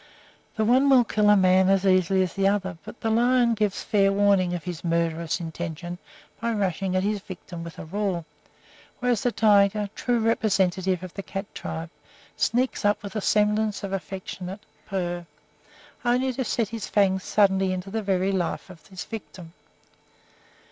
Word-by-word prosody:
The 220 Hz, -1 st, +1 dB
one 260 Hz, +5 st, +4 dB
will 260 Hz, -3 st, +6 dB
kill 210 Hz, -2 st, +2 dB
a 210 Hz, -, +7 dB
man 185 Hz, 0 st, +4 dB
as 195 Hz, 0 st, +3 dB
easily 185 Hz, 0 st, +3 dB
as 180 Hz, -, -4 dB
the 195 Hz, -1 st, +2 dB
other, 195 Hz, -2 st, 0 dB
but -, -, -11 dB
the 225 Hz, -, 0 dB
lion 240 Hz, +1 st, +3 dB
gives 210 Hz, -3 st, -1 dB
fair 195 Hz, -2 st, +3 dB
warning 195 Hz, -3 st, +3 dB
of 175 Hz, -, -5 dB
his 175 Hz, -3 st, -6 dB
murderous 165 Hz, -1 st, 0 dB
intention 175 Hz, +1 st, -6 dB, 0.4 s
by 230 Hz, 0 st, 0 dB
rushing 190 Hz, -2 st, -1 dB
at 185 Hz, -, +2 dB
his 205 Hz, +1 st, 0 dB
victim 180 Hz, -3 st, -9 dB
with 170 Hz, -1 st, -9 dB
a -, -, -7 dB
roar, 185 Hz, -1 st, -2 dB, 0.7 s
whereas 245 Hz, -3 st, +1 dB
the 245 Hz, -, +1 dB
tiger, 205 Hz, -2 st, +3 dB
true 245 Hz, -1 st, 0 dB
representative 190 Hz, -5 st, +1 dB
of 185 Hz, -, -8 dB
the 195 Hz, -, -5 dB
cat 195 Hz, +1 st, -5 dB
tribe, 165 Hz, +1 st, -6 dB, 0.4 s
sneaks 250 Hz, +2 st, 0 dB
up 205 Hz, 0 st, +2 dB
with 205 Hz, 0 st, -4 dB
semblance 210 Hz, 0 st, +1 dB
of 195 Hz, -1 st, -4 dB
affectionate 190 Hz, 0 st, -6 dB, 0.3 s
purr, 175 Hz, -4 st, -3 dB, 0.8 s
only 250 Hz, +2 st, +1 dB
to 260 Hz, -, -2 dB
set 230 Hz, -2 st, -1 dB
his 225 Hz, -1 st, -5 dB
fangs 190 Hz, -2 st, +2 dB
suddenly 195 Hz, -2 st, +2 dB
into 185 Hz, +1 st, -4 dB
the 220 Hz, +1 st, -1 dB
very 190 Hz, -1 st, +1 dB
life 185 Hz, 0 st, -2 dB
of 170 Hz, -3 st, -16 dB
his 190 Hz, -2 st, -7 dB
victim. 185 Hz, -6 st, -9 dB
195 Hz, 170 wpm, -25 LUFS, 185-215 Hz, 0.8 s, a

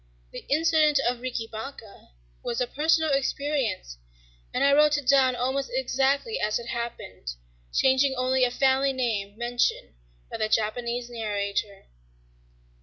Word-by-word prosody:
The -, -, -8 dB
incident 305 Hz, -1 st, +3 dB
of 245 Hz, 0 st, 0 dB
"Riki 250 Hz, -3 st, -3 dB
Baka" 225 Hz, -1 st, -9 dB, 0.3 s
was 235 Hz, -, -3 dB
a 250 Hz, -, +2 dB
personal 315 Hz, +4 st, +1 dB
experience; 275 Hz, -, -1 dB, 0.5 s
and -, -, 0 dB
I 280 Hz, 0 st, +5 dB
wrote 300 Hz, 0 st, +5 dB
it 285 Hz, -3 st, -6 dB
down 260 Hz, -2 st, +5 dB
almost 265 Hz, -, -1 dB
exactly 280 Hz, -, 0 dB
as 210 Hz, 0 st, 0 dB
it 235 Hz, -1 st, -8 dB
happened, 95 Hz, -, -5 dB, 0.4 s
changing 265 Hz, -, +3 dB
only 255 Hz, 0 st, +1 dB
a 250 Hz, -, +4 dB
family 270 Hz, +2 st, +2 dB
name 215 Hz, -5 st, -2 dB
mentioned 240 Hz, -, -1 dB, 0.4 s
by -, -, -4 dB
the 215 Hz, -, -1 dB
Japanese 235 Hz, +3 st, -1 dB
narrator. 205 Hz, -3 st, -3 dB
255 Hz, 135 wpm, -26 LUFS, 225-275 Hz, 0.5 s, I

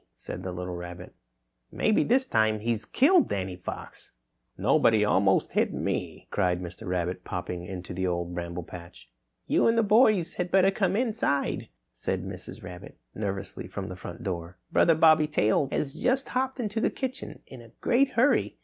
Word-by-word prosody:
said -, -, -7 dB
the 95 Hz, 0 st, -4 dB
little 90 Hz, 0 st, -5 dB
rabbit, 90 Hz, 0 st, -8 dB, 0.6 s
"maybe 215 Hz, -, +2 dB
this 260 Hz, +3 st, +2 dB
time 110 Hz, -, +2 dB
he's 115 Hz, 0 st, -1 dB
killed 330 Hz, +6 st, +4 dB
Danny 95 Hz, -2 st, -2 dB
Fox!" 90 Hz, -, -8 dB, 0.4 s
"No, -, -, +3 dB
but 115 Hz, -, +5 dB
he 105 Hz, -1 st, +3 dB
almost 95 Hz, -2 st, +3 dB
hit -, -, +1 dB
me!" -, -, -3 dB
cried 90 Hz, -3 st, +1 dB
Mr. 90 Hz, +4 st, -8 dB
Rabbit, 90 Hz, 0 st, -2 dB
popping 90 Hz, -1 st, -5 dB
into 90 Hz, -2 st, -6 dB
the 95 Hz, +1 st, -1 dB
Old 85 Hz, 0 st, -2 dB
Bramble 85 Hz, 0 st, -4 dB
Patch. 85 Hz, -9 st, -12 dB, 0.3 s
"You -, -, +3 dB
and 230 Hz, 0 st, +3 dB
the 230 Hz, -, +4 dB
boys 210 Hz, -5 st, +4 dB
had 180 Hz, 0 st, -1 dB
better 195 Hz, +1 st, +4 dB
come 195 Hz, -1 st, 0 dB
inside," 220 Hz, -, 0 dB, 0.2 s
said -, -, -3 dB
Mrs. -, -, -8 dB
Rabbit 90 Hz, -1 st, -10 dB, 0.2 s
nervously 100 Hz, -3 st, -4 dB
from -, -, -6 dB
the 90 Hz, -, -6 dB
front 90 Hz, +5 st, -9 dB
door. 90 Hz, -3 st, -4 dB
"Brother 165 Hz, -, +5 dB
Bobby 155 Hz, -1 st, +5 dB
Tail 135 Hz, -2 st, +2 dB
has 135 Hz, -2 st, -1 dB
just 260 Hz, +2 st, +1 dB
hopped 260 Hz, +1 st, -1 dB
into 220 Hz, -1 st, -2 dB
the -, -, +3 dB
kitchen 265 Hz, 0 st, -6 dB
in 130 Hz, -3 st, -11 dB
a 115 Hz, -, -14 dB
great 260 Hz, +2 st, +2 dB
hurry. 255 Hz, +5 st, +2 dB
110 Hz, 175 wpm, -27 LUFS, -, 0.6 s, but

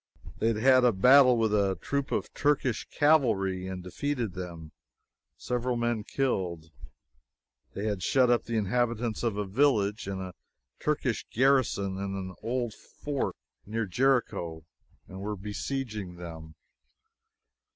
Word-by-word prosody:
They 110 Hz, -, +1 dB
had 115 Hz, -2 st, +1 dB
had 130 Hz, +2 st, +5 dB
a 125 Hz, -, +6 dB
battle 125 Hz, +5 st, +6 dB
with 110 Hz, -2 st, +1 dB
a 100 Hz, -2 st, +2 dB
troop 140 Hz, -1 st, -2 dB
of -, -, -2 dB
Turkish 145 Hz, -5 st, 0 dB
cavalry 105 Hz, -12 st, +2 dB
and 95 Hz, -1 st, -6 dB
defeated 120 Hz, +3 st, -3 dB
them; 85 Hz, -4 st, -7 dB, 0.7 s
several 125 Hz, 0 st, -2 dB
men 120 Hz, -2 st, 0 dB
killed. 90 Hz, -, -2 dB, 1.0 s
They 100 Hz, -, -3 dB
had 105 Hz, -4 st, -1 dB
shut 130 Hz, +7 st, +3 dB
up 120 Hz, -, +2 dB
the 115 Hz, -1 st, -2 dB
inhabitants 115 Hz, +2 st, 0 dB
of 115 Hz, -4 st, -1 dB
a 105 Hz, -, -1 dB
village 105 Hz, -2 st, +1 dB
and 95 Hz, -1 st, -3 dB
a 95 Hz, -1 st, -6 dB, 0.5 s
Turkish 145 Hz, -6 st, -1 dB
garrison 120 Hz, -7 st, +2 dB
in 95 Hz, 0 st, -3 dB
an 95 Hz, -1 st, -5 dB
old 120 Hz, 0 st, -2 dB
fort 145 Hz, +4 st, -4 dB, 0.3 s
near 110 Hz, +1 st, -1 dB
Jericho, 95 Hz, -, 0 dB, 0.4 s
and 95 Hz, +1 st, -9 dB
were 105 Hz, +1 st, -3 dB
besieging 105 Hz, -1 st, -4 dB
them. 80 Hz, -2 st, -9 dB
110 Hz, 135 wpm, -28 LUFS, 95-125 Hz, 1.0 s, a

